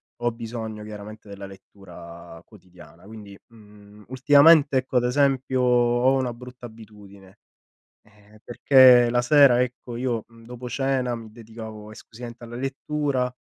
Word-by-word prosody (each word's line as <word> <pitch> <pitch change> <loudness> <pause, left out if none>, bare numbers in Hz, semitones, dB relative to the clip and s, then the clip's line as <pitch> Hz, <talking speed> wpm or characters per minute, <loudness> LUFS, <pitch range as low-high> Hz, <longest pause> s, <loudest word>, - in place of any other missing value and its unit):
ho 120 0 -2
bisogno 110 -2 -8
chiaramente 105 0 -11
della 100 -1 -10
lettura 85 -4 -14
quotidiana. 90 -4 -19
Quindi, 105 -2 -12
mhmm, 105 -2 -19
ultimamente 145 +2 +4
ecco 130 0 -2
ad 125 - +1
esempio 130 0 0
ho 125 +1 +2
una 125 -2 -3
brutta 125 0 -12
abitudine, 105 -4 -17 0.6
ehm 105 0 -23
perché 125 -1 +5
la 120 0 0
sera 135 -2 +5
ecco 125 -1 -8
io 120 -3 -3
mhmm 115 -1 -19
dopo 125 0 -9
cena 130 -1 -2
mi 110 -2 -11
dedicavo 110 -2 -11
esclusivamente 120 +2 -12
alla 120 0 -10
lettura, 135 -1 -3
120 Hz, 135 wpm, -23 LUFS, 105-125 Hz, 0.6 s, perché